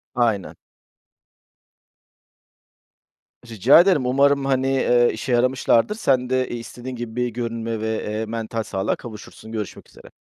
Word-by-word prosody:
Aynen. 115 -6 0 2.9
Rica 115 - +5
ederim. 175 -8 +2
Umarım, 140 +2 +3
hani, 135 -1 +1
eee, 125 -2 +3
işe 115 +4 -5
yaramışlardır. 125 - +2
Sen 130 - +1
de, 130 0 0
iii, 120 - -4
istediğin 125 +2 -8
gibi 120 -2 -7
bir 125 0 0
görünüme 115 -1 -4
ve, 110 0 -2
eee, 110 +1 -3
mental 115 0 -4
sağlığa 95 -2 -2
kavuşursun. 110 -1 -11
Görüşmek 105 -4 -6
üzere. - - -16
120 Hz, 130 wpm, -22 LUFS, 110-130 Hz, 2.9 s, Rica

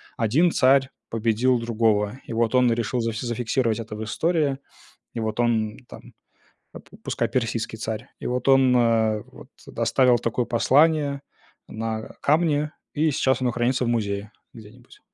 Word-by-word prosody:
один 140 +11 +2
царь 135 -1 +4 0.2
победил 115 +2 +1
другого. 110 -1 0
И - - -7
вот 115 +2 0
он 125 -2 +4
решил 120 +1 -1
за 115 0 -1
зафиксировать 120 0 -1
это 105 -1 -8
в 110 - -5
истории. 155 +2 0 0.6
И 115 - -3
вот 110 +1 -2
он 110 -3 0
там - - -13 0.6
па - - -11 0.2
пускай, - - -1
персидский 115 -2 -2
царь, 110 +2 -5
и - - -5
вот 125 +2 -2
он, 135 -2 +5
э, 110 -3 +2
вот - - -15 0.3
оставил 120 +2 +3
такое 115 +2 -1
послание 140 +4 +2 0.5
на 110 0 -4 0.2
камне, 150 -1 +1 0.2
и 155 +1 +2
сейчас 130 -2 +1
оно 125 - +1
хранится 120 +2 0
в - - -1
музее 105 -3 -2 0.2
где-нибудь, 115 +2 -15
120 Hz, 150 wpm, -24 LUFS, 110-130 Hz, 0.6 s, он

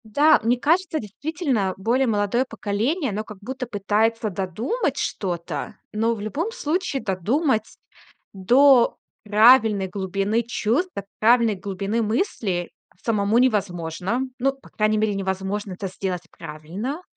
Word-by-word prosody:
Да, 285 +8 +4
мне 240 +2 +2
кажется, 325 +3 +1
действительно 245 - -2
более 240 +7 +1
молодое 215 +3 +1
поколение, 245 - -1
оно 210 +2 -3
как 215 -1 -11
будто 255 +4 -5
пытается 215 +2 0
додумать 200 - -2
что-то. 175 -4 -3 0.2
Но 225 +2 +1
в 210 - -8
любом 290 - -3
случае 360 - -2
додумать 220 - 0 0.6
до 245 +6 +5 0.3
правильной 215 -1 +5
глубины 195 +3 -1
чувств, 240 - 0
до 200 - -4 0.2
правильной 230 0 +4
глубины 200 +3 -2
мысли 215 - -1 0.3
самому 215 -1 +1
невозможно. 195 -2 0 0.2
Ну, 270 +2 +2
по 270 - -19
крайней 215 0 +1
мере, 215 -1 +1
невозможно 190 +1 -3
это 195 +2 -5
сделать 185 -1 -4
правильно. 185 - -6
215 Hz, 125 wpm, -23 LUFS, 195-255 Hz, 0.6 s, до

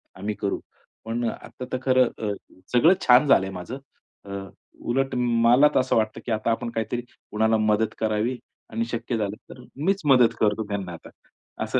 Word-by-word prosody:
आम्ही 105 +3 -4
करू." 100 -2 -1 0.5
पण 115 +2 -2
आता 125 - -8
तर - - +1
खरं 130 -2 +4 0.2
अ, - - 0 0.4
सगळं 155 +9 +6
छान 125 +4 +7
झालंय 95 -7 +4
माझं 120 +9 -6 0.5
अ, 100 - -9 0.5
उलट 135 +2 -1
मला 120 +3 +4
तर - - +6
असं 130 0 +1
वाटतं, 110 -1 0
की 120 - -3
आता 110 +1 0
आपण 115 +1 -2
काहीतरी 115 +2 -2 0.3
कुणाला 110 +1 +2
मदत 110 0 +1
करावी 110 +3 0 0.3
आणि 115 +1 -2
शक्य 115 0 -2
झालं 105 -2 -2 0.2
तर 125 - -12 0.2
मीच 195 +1 +2
मदत 125 -5 +5
करतो 110 +1 +2
त्यांना 100 -4 -4
आता 85 - -11 0.5
असं. - - 0
115 Hz, 175 wpm, -24 LUFS, 110-125 Hz, 0.5 s, छान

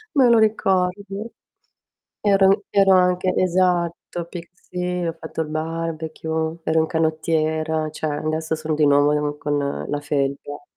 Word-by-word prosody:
Me 260 -4 +5
lo 235 - +6
ricordo. 200 0 0 0.9
Ero 195 0 +4
ero 195 -1 +5
anche 180 0 +3
esatto, 175 -1 0
pic 170 -1 -8
sì, 180 0 -4
ho 165 - -1
fatto 160 0 -5
il 160 - -3
barbecue, 160 0 -3
ero 160 0 +2
un 160 - +3
canottiera, 160 -1 0
cioè, 155 - -5
adesso 155 +2 -2
sono 155 0 -3
di 150 0 +3
nuovo 145 0 +4
in 150 0 -1
con 145 0 -1 0.3
la 145 0 -2
felpa. 145 0 -2
160 Hz, 140 wpm, -22 LUFS, 155-180 Hz, 0.9 s, lo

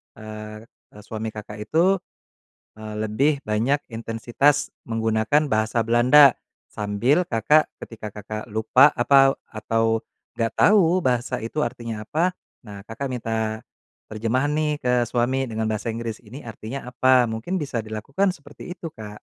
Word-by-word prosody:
eee 110 0 -9 0.3
eee, 105 - -11
suami 110 +1 -5
Kakak 105 0 -8
itu, 185 +4 +3 0.8
eee, 110 0 -8
lebih 140 +7 +1
banyak 120 +7 +1
intensitas 120 +6 0 0.2
menggunakan 115 +6 +1
bahasa 110 0 +1
Belanda, 125 +4 +6 0.3
sambil 105 - +1
Kakak 135 +7 +3
ketika 110 -2 -8
Kakak 105 +1 -6
lupa 120 +6 +5
apau 135 +2 +5
atau 115 +1 0 0.3
nggak 115 -1 -1
tahu 185 -4 +5
bahasa 125 -1 0
itu 135 +7 -3
artinya 115 -3 -4
apa, 165 +11 0 0.3
nah 100 -1 -9
Kakak 115 +6 -6
minta 110 -3 -3 0.5
terjemahan 115 +6 0
nih 150 -1 -1
ke 125 -1 +2
suami 125 +3 0
dengan 110 -2 -2
bahasa 110 +1 -3
Inggris, 115 -1 -5
ini 125 +6 -11
artinya 115 +3 -7
apa? 125 0 +4
Mungkin 110 +12 -3
bisa 135 -4 -3
dilakukan 135 - -1
seperti 145 +4 -10
itu, 165 -3 -7
Kak. 105 -7 -10
115 Hz, 135 wpm, -23 LUFS, 110-140 Hz, 0.8 s, Belanda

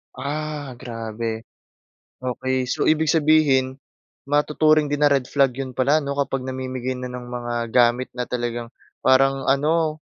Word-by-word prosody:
Ah, 145 -1 -5
grabe. 115 -1 -5 0.8
Okey. 130 0 -2
So, - - 0
ibig 155 0 +2
sabihin, 150 -5 +3 0.6
matuturing 150 +1 +3
din 145 0 -2
na 145 - +6
red 135 -3 +2
flag 140 +1 +2
'yon 130 -1 -5
pala 135 +4 +3
'no, 140 -2 -2
kapag 135 -2 -2
namimigay 130 -1 -4
na 125 0 -6
ng 125 0 -7
mga 120 -1 -5 0.2
gamit 120 +1 +3
na 125 -1 -4
talagang 120 -1 -3 0.3
parang 135 +1 +3
ano, 155 +3 +1
130 Hz, 145 wpm, -22 LUFS, 125-145 Hz, 0.8 s, na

